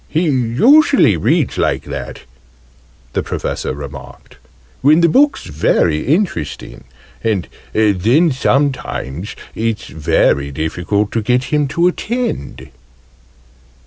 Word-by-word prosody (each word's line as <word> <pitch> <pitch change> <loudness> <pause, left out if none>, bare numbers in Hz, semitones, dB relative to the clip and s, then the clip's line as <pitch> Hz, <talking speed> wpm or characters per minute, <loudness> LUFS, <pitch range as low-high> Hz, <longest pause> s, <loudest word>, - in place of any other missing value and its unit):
"He 160 +3 0
usually 150 - +4
reads 80 - 0
like - - 0
that," - - -7 0.9
the - - 0
Professor - - -4
remarked, 70 -1 -10 0.4
"when 155 +5 +5
the 170 - +5
book's 280 - +3
very 75 0 0
interesting: 170 - -2 0.4
and 105 -6 -1 0.2
then 110 - +2
sometimes 130 - -1 0.2
it's 115 -2 -2
very 70 -2 +1
difficult 90 +8 -2
to 115 - -1
get 125 +3 +1
him 150 -1 +2
to 170 +6 +1
attend!" 235 - -3
115 Hz, 105 wpm, -16 LUFS, -, 0.9 s, when